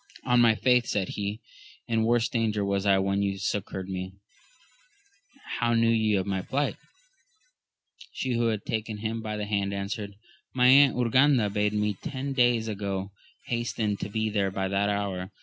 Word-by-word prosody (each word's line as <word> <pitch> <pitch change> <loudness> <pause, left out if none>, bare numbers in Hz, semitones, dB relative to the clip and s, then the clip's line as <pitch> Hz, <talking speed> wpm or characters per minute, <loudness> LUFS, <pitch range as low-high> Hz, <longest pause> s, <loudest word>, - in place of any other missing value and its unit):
On 125 -1 +4
my 115 -2 +5
faith, 125 0 +3
said 95 -3 -1
he, 105 +2 -4 0.5
in 115 -1 +1
worse 120 +1 +2
danger 110 -3 0
was 100 0 -1
I 100 -1 +5
when 100 +1 0
you 100 -1 -1
succoured 95 -1 -3
me: 95 0 -5 1.5
how 120 -1 +2
knew 115 0 +3
ye 110 -2 +2
of 95 -1 0
my 95 -1 -1
plight? 140 +9 -1 1.4
She 130 -1 -3
who 120 0 +1
had 110 -3 -2
taken 110 -1 -3
him 110 +2 -3
by 110 -1 -4
the 105 - -3
hand 100 -1 -1
answered. 100 +1 -4 0.4
My 125 -1 +3
Aunt 140 +1 +7
Urganda 125 -2 +3
bade 105 0 +1
me 105 -1 0
ten 135 +1 -4
days 120 -3 +2
ago 100 -2 -3 0.3
hasten 115 -3 -1
to 100 - -5
be 110 +1 -1
there 100 -2 +1
by 95 0 -2
that 100 +1 +1
hour. 100 -2 -2
105 Hz, 170 wpm, -27 LUFS, 100-115 Hz, 1.5 s, Aunt